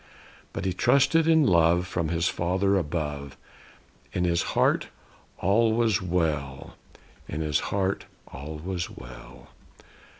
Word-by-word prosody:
But - - -5
he 95 - 0
trusted 140 - +3
in 160 -1 +5
love, 85 -1 +4
from 85 -3 -2
his 85 +1 0
Father 95 +3 +1
above. 75 -5 -3 0.8
In 90 - 0
his 85 -1 +2 0.2
heart, - - +3 0.5
all 110 +4 +3
was 110 -3 +2
well; 75 -6 -2 0.5
in 75 - -4
his 75 -2 +1
heart, 95 -1 -1 0.2
all 75 +4 -8
was 90 +2 -4
well. - - -12
90 Hz, 125 wpm, -26 LUFS, 75-100 Hz, 0.8 s, in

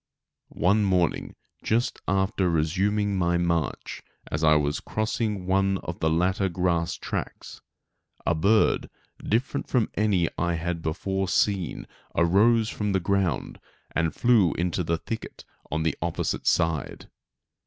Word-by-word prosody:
One 100 +4 +3
morning, 90 -4 0 0.3
just 115 +3 0
after 95 -1 +1
resuming 95 +5 +1
my 85 0 +2
march 85 -4 -2 0.3
as 75 +2 -2
I 75 0 +6
was 75 -1 +1
crossing 110 -3 -2
one 95 +1 +2
of 85 - -6
the 80 - +1
latter 95 +4 +1
grass 85 -1 0
tracts, - - -6 0.6
a - - +3
bird 100 +7 +2 0.3
different 125 +6 -1
from 120 -4 +1
any 100 -5 +2
I 85 0 +1
had 85 0 -3
before 95 +5 -2
seen 95 -1 0 0.3
arose 105 +7 +4
from 105 -2 -2
the 95 - +2
ground 95 -1 -1 0.3
and 80 -1 0
flew 115 -8 +4
into 90 +1 -1
the 85 0 0
thicket 110 +6 -7 0.2
on 80 +2 -1
the 80 - 0
opposite 85 0 -2
side. 80 -4 0
90 Hz, 130 wpm, -26 LUFS, 85-100 Hz, 0.6 s, I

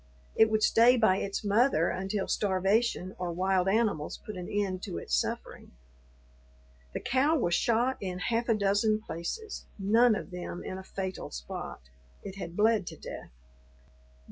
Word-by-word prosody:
It 220 - +5
would 215 0 +1
stay 240 +3 +6
by 205 -5 +4
its 200 +2 -3
mother 205 - +3
until 190 +2 -2
starvation 195 0 +1
or 180 -1 -2
wild 185 +1 +1
animals 205 -8 0
put 215 - -6
an 180 -1 -6
end 195 -3 -1
to - - -5
its 75 - -6
suffering. 65 - -3 1.2
The - - -1
cow 280 +6 +2
was 175 - 0
shot 240 +6 +2
in 185 -2 -3
half 230 +6 -1
a 225 - +4
dozen 210 +1 +2
places, 225 - -5
none 220 +4 +4
of 195 - -6
them 180 -1 -6
in 185 - -5
a - - -9
fatal 190 0 -5
spot; 60 +1 -7 0.4
it 195 -1 -8
had 175 -2 -7
bled 215 -3 +3
to - - -7
death. - - -8
200 Hz, 160 wpm, -29 LUFS, 185-225 Hz, 1.2 s, stay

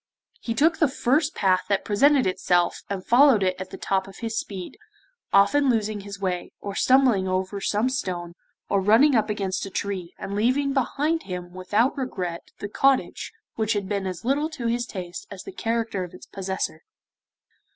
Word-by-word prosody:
He 230 - -3
took 320 +6 +3
the 310 - +5
first 290 +3 +1
path 185 -2 +2
that 200 -1 +1
presented 275 +6 +4
itself 180 -1 +1
and 195 -2 -4
followed 245 -4 +6
it 185 -1 +1
at 185 - -6
the - - -8
top 190 -1 -1
of 195 - -12
his 225 -1 -4
speed, 195 -5 -5 0.5
often 270 +8 +4
losing 215 -3 0
his 200 0 -8
way, 180 -2 -3
or 200 - -5
stumbling 250 -5 +4
over 185 +2 -2
some 210 +5 +1
stone, 180 -9 -3 0.3
or 200 - +1
running 225 +9 +5
up 220 -2 +2
against 195 -2 -2
a - - -7
tree, 190 -2 -4
and 195 +1 -6
leaving 260 +6 +1
behind 295 +5 0
him 180 -1 -6
without 205 +8 +1
regret 185 -11 -4
the 205 - -5
cottage 270 +5 +1 0.3
which 220 -1 +1
had 200 -2 -2
been 200 -1 -2
as 185 +4 -6
little 290 +4 +1
to 285 -7 -7
his 240 +1 0
taste 180 -4 -7
as 200 - -8
the - - -8
character 230 - -2
of 180 - -9
its - - -12
possessor. 190 -4 -4
205 Hz, 180 wpm, -25 LUFS, 190-255 Hz, 0.5 s, followed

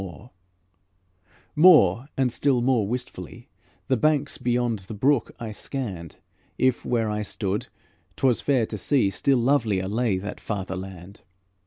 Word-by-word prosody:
More, 140 - +6
and 130 -2 +2
still 130 -3 +1
more 120 -5 +2
wistfully, 115 -7 -6 0.4
The 130 - +2
banks 145 +2 +1
beyond 120 -2 0
the 95 +3 -9
brook 130 +3 +1
I 115 -2 -5
scanned; 105 - -6 0.4
If, 130 -2 +1
where 115 -3 0
I 105 0 -2
stood, 105 0 -3 0.5
't - - -2
was 125 -3 +3
fair 130 -5 +2
to 105 -1 -6
see, 115 -4 +2
Still 135 +7 +2
lovelier 115 -7 +1
lay 110 -1 0
that 100 +3 -6
farther 95 -3 -4
land. 95 +1 -9
115 Hz, 140 wpm, -24 LUFS, 100-130 Hz, 0.5 s, More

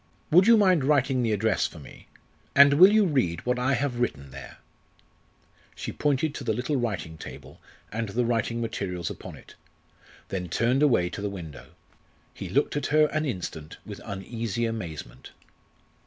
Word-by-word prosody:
Would 180 +6 +6
you 230 -1 +7
mind 185 -8 +4
writing 135 -2 +2
the 115 -2 0
address 110 +1 +1
for - - -13
me, 70 - -13 0.5
and 140 0 +8
will 185 +7 +8
you 215 -1 +4
read 120 - 0
what 125 0 0
I 135 +2 +2
have 125 -1 -2
written 70 - -2
there?" 70 +1 -10 1.2
She - - -5
pointed 145 +1 0
to 140 - -6
the 115 -3 0
little 125 +5 -2
writing 100 -10 -3
table - - -11 0.3
and 115 0 -3
the 120 +4 0
writing 115 0 -1
materials 95 -7 -3
upon - - -9
it, - - -15 0.8
then 90 -2 -4
turned 120 - +1
away 115 -12 +3
to 100 - -6
the 105 - -2
window. 85 -7 -9 0.6
He - - -7
looked - - +1
at 145 - -1
her 150 0 +4
an 155 0 -1
instant 85 - -5
with - - -9
uneasy 115 +3 -3
amazement. 100 -10 -6
120 Hz, 170 wpm, -26 LUFS, 95-140 Hz, 1.2 s, and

